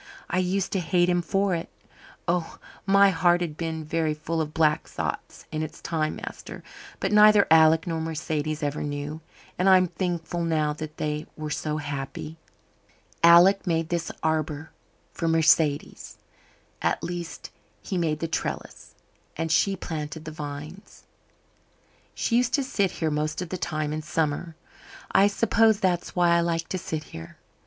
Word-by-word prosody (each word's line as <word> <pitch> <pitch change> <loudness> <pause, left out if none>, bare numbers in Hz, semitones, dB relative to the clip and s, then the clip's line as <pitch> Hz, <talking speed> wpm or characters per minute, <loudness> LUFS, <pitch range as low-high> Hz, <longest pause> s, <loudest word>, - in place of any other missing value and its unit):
I 185 - +1
used 185 +1 0
to 195 - 0
hate 175 +1 +2
him 175 0 +2
for 195 +3 0
it. 165 -1 -3 0.6
Oh, 170 -1 -1 0.3
my 200 0 +6
heart 175 +1 +3
has 170 -3 -1
been 160 0 -4
very 155 0 0
full 160 +2 -2
of 150 -1 -3
black 155 0 +2
thoughts - - -5
in 155 -1 -2
its 155 -1 -6
time, 155 -2 -2
master. - - -8 0.4
But - - -1
neither 210 -1 +7
Alec 160 0 +6
nor 165 -2 -2
Mercedes 155 -1 -3
ever 145 0 -2
knew. 145 +2 -4 0.4
And 185 +2 +4
I'm 185 -1 +6
thankful 175 -1 -3
now 155 -3 +1
that 155 0 -8
they 150 0 -3
were 155 -1 -5
so 150 +1 -2
happy. 145 +2 -6 0.8
Alec 175 +4 +6
made 165 -1 0
this 170 -2 -2
arbour 155 -1 -1 0.4
for 165 - -2
Mercedes 160 -2 +2 0.6
at - - 0
least 175 -1 -6 0.3
he 195 - -4
made 160 -4 0
the 165 - -1
trellis, 165 - -5 0.4
and 165 0 -2
she 195 +4 +3
planted 155 -2 -6
the 155 - -6
vines. 150 +4 -8 1.1
"She 235 - +1
used 245 -1 +2
to 280 - 0
sit 200 -7 0
here 160 -2 -2
most 150 +1 -1
of 180 -2 -4
the - - -3
time 155 -2 -2
in 155 - -3
summer. 155 +1 -2 0.6
I 200 - +5
suppose 220 +1 +3
that's 180 -4 -1
why 175 -1 +3
I 170 - +5
like 165 -1 -1
to 185 - -2
sit 155 -2 -4
here. 80 - -11
165 Hz, 160 wpm, -26 LUFS, 155-175 Hz, 1.1 s, neither